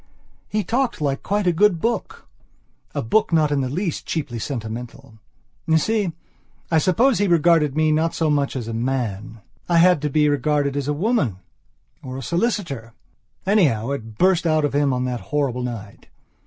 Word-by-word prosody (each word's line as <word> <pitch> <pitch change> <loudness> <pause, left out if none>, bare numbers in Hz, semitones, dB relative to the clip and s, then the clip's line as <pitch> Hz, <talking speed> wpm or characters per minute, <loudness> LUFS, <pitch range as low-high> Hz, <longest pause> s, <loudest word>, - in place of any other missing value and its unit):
He 215 0 -1
talked 245 -1 -1
like 140 -2 -1
quite 205 0 -1
a 175 - +3
good 190 0 +3
booka 235 +6 -2 0.8
book 215 - +2
not 155 -2 +3
in 145 -1 +1
the 130 - -2
least 170 +4 -3
cheaply 140 -8 -3
sentimental. 115 0 -6 0.5
You 160 0 +4
see, 205 +2 0 0.6
I 160 - +4
suppose 220 - +3
he 205 - +2
regarded 165 -4 +3
me 155 0 +2
not 160 +2 +1
so 160 -2 +1
much 140 -2 0
as 120 -4 -4
a 115 - -4
man. 115 -3 -3 0.3
I 170 - +3
had 175 -2 +5
to 150 - -1
be 150 +1 +3
regarded 145 0 +1
as 140 -1 -2
a - - +1
woman 175 - 0 0.6
or 130 0 -7
a 135 - -6
solicitor. 170 - -2 0.5
Anyhow, 140 - +2
it 115 -6 -6
burst 180 -2 +3
out 155 -2 +2
of 145 - -2
him 145 -1 +2
on 125 0 -1
that 125 -2 -3
horrible 140 -4 0
night. 115 -5 -7
150 Hz, 175 wpm, -22 LUFS, 125-175 Hz, 0.8 s, had